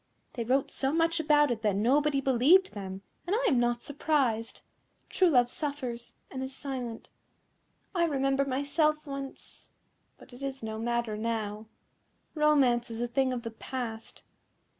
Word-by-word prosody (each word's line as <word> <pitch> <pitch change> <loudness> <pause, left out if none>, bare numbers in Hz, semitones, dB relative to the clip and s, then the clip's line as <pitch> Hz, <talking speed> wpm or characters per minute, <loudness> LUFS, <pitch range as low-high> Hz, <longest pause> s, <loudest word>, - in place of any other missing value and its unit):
They 240 -6 -3
wrote 260 +4 +1
so 270 0 0
much 330 +1 +2
about 295 -3 +4
it 225 -2 -2
that 210 -3 +1
nobody 275 +7 +2
believed 275 +9 +4
them, 195 -1 -6 0.2
and 385 - +1
I - - 0
am 260 - +3
not 240 0 0
surprised. 270 -6 0 0.5
True 370 -2 +4
love 245 -5 +4
suffers, 255 -4 -5 0.2
and 260 - -5
is 265 0 -5
silent. 250 -5 -6 0.8
I 345 -2 +2
remember 275 -3 +1
myself 285 +3 +1
once 275 -1 -8 0.5
But - - -16
it 245 - -12
is 270 -2 -5
no 220 0 -4
matter 235 -2 -1
now. 215 -1 -3 0.7
Romance 275 -6 +3
is 225 0 -6
a 240 - 0
thing 260 +2 +1
of 245 -2 -3
the 230 - -5
past." 225 -1 -6
260 Hz, 155 wpm, -29 LUFS, 235-290 Hz, 0.8 s, about